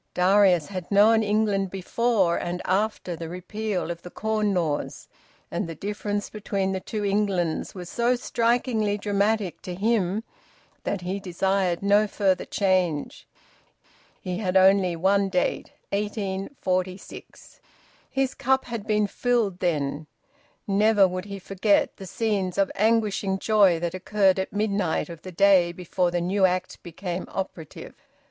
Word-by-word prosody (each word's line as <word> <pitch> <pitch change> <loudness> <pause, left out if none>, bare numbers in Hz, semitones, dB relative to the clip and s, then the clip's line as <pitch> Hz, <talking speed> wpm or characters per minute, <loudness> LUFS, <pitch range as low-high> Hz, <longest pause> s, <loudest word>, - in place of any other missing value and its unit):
Darius 185 -3 +4
had 185 -3 -6
known 215 +3 +5
England 205 -2 +1
before 195 -1 +1
and 175 +1 -3
after 190 -2 -1
the 165 0 -7
repeal 185 +1 -3
of 170 0 -7
the 180 - -9
Corn 215 +1 -1
Laws, 165 -6 -2 0.4
and 195 -7 -2
the 165 - -6
difference 205 +2 -3
between 200 -2 -2
the 190 - -2
two 210 +2 -4
Englands 195 -5 0
was 180 -2 -7
so 240 +6 +1
strikingly 235 -3 0
dramatic 205 -1 0
to 180 - -6
him 210 0 0 0.6
that 200 - -2
he 185 +3 -3
desired 190 -1 0
no 205 +1 +4
further 195 -3 0
change. 185 -6 0 0.9
He 180 0 -4
had 190 -3 +1
only 190 -2 +4
one 195 +3 +2
date 180 -1 -1 0.2
1846. 195 -2 -4 0.5
His 270 -1 0
cup 265 +1 +1
had 230 -3 -6
been 210 -1 +2
filled 220 -3 0
then. 150 -3 -1 0.6
Never 205 0 +4
would 185 +1 -5
he 200 -1 -6
forget 195 +2 +1
the 190 - -9
scenes 200 -4 -1
of 195 -1 +2
anguishing 210 -2 +1
joy 195 -5 +4
that 170 0 -2
occurred 190 0 +2
at 190 - -3
midnight 200 -5 -1
of 165 -2 -9
the 185 - -9
day 185 -1 +4
before 180 +1 -1
the 175 0 -1
new 190 +3 0
Act 185 0 -1
became 175 +1 -5
operative. 170 -5 -6
195 Hz, 140 wpm, -25 LUFS, 180-210 Hz, 0.9 s, known